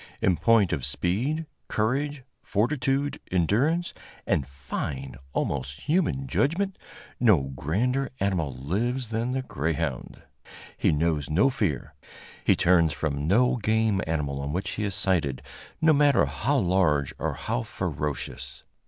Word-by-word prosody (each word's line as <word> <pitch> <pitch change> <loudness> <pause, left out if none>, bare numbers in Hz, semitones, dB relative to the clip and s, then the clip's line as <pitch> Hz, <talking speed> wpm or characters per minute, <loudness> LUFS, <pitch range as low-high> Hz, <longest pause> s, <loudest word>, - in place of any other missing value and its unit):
In 95 - +3
point 110 -1 +4
of 70 -4 -2
speed, 125 - -1 0.2
courage, 135 +5 -1 0.2
fortitude, 135 +5 0
endurance 125 - +1 0.3
and 70 - +1
fine, 70 0 -5 0.2
almost 70 0 -2
human 150 - +1
judgment, 165 - 0 0.4
no 105 - +5
grander 125 - 0
animal 90 -7 0
lives 105 - -2
than 115 +3 -1
the 130 0 -1
greyhound. 75 - -3 0.5
He - - +2
knows 75 -2 0
no 100 - +4
fear; 105 - -2 0.5
he - - +4
turns 85 -4 +4
from 70 -1 -2
no 125 +7 +4
game 110 -2 +1
animal 70 -4 -1
on 70 +1 -3
which 95 +5 -2
he 105 - -2
is 100 -2 -2
sighted, 85 -9 0 0.4
no 160 0 +6
matter 145 -3 +4
how 140 +6 0
large 85 - +2
or - - -1
how - - -2
ferocious. 75 +2 -4
95 Hz, 130 wpm, -26 LUFS, -, 0.5 s, no